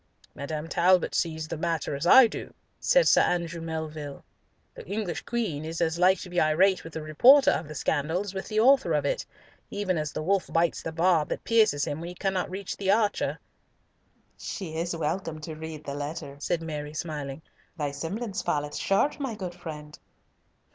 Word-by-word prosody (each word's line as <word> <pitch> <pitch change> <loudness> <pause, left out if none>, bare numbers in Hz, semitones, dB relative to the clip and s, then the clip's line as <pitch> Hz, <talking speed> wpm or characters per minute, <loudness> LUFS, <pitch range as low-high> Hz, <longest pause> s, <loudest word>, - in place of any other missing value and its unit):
"Madame 150 +3 -5
Talbot 180 +1 +3
sees 160 -2 -1
the 160 - -4
matter 165 -2 -1
as 145 +5 -2
I 260 +6 +9
do," 225 - -6 0.2
said - - +4
Sir - - +6
Andrew 170 -1 -1
Melville. 155 -3 -5 0.5
"The - - -10
English 200 -2 -3
Queen 205 -12 -2
is 160 +1 -5
as 170 0 0
like 185 +1 +5
to 185 - -8
be 175 - +2
irate 180 +5 +3
with 165 - -10
the 160 - -5
reporter 250 - +6
of 160 - -2
the 155 - -8
scandal 160 +5 0
as 200 -2 -6
with 190 - -5
the 215 -1 0
author 270 +4 +5
of - - +1
it, - - 0 0.5
even 190 -4 -1
as 150 -1 -3
the - - -4
wolf 195 +3 0
bites 165 0 +1
the 165 - -4
barb 165 -1 +2
that - - -4
pierces 215 -11 +3
him 145 - -4
when 170 - -5
he 180 - -9
cannot 190 0 -1
reach 190 +1 -5
the 195 -1 -2
archer." 210 0 +2 1.0
"She 170 -6 -6
is 170 +1 -2
welcome 165 0 -3
to 160 +1 -6
read 155 -1 -8
the 140 - -5
letter," 145 0 -5
said 165 +3 -1
Mary, 150 -1 -5
smiling; 150 -2 -5 0.3
"thy 145 -3 -2
semblance 190 +9 -4
falleth 145 0 -2
short, 200 +11 +1
my 265 -6 -3
good 185 -4 -5
friend." 150 -4 -9
165 Hz, 190 wpm, -27 LUFS, 155-195 Hz, 1.0 s, I